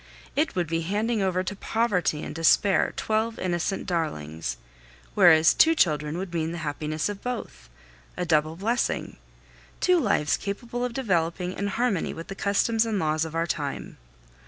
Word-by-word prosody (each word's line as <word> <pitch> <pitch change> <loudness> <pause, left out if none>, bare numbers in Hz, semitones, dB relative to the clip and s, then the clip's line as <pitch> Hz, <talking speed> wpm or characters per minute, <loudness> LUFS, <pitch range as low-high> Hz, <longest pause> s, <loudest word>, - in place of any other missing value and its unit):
It - - +1
would 175 -1 +1
be 165 +1 -1
handing 210 +6 0
over 185 -1 +1
to 200 +2 -4
poverty 195 -8 0
and - - -6
despair 165 +5 +3
twelve 220 +1 0
innocent 180 +1 -2
darlings; 80 - -3 0.6
whereas 160 -5 +6
two 325 +1 +5
children 150 - +1
would 185 -1 -5
mean 165 0 -1
the - - -4
happiness 150 +1 -2
of 205 -1 -6
both, 245 - -6 0.5
a 180 - -1
double 155 -1 +2
blessing, 225 +7 -1 0.6
two 365 -1 +4
lives 205 - +1
capable 235 +5 -4
of 250 -1 -2
developing 180 -6 -1
in 200 - -3
harmony 210 -3 -1
with 165 - -8
the - - -4
customs 205 +3 +1
and 225 -2 -1
laws 155 -2 0
of 160 0 -7
our 165 0 +1
time. 145 -4 -4
180 Hz, 160 wpm, -26 LUFS, 160-210 Hz, 0.6 s, whereas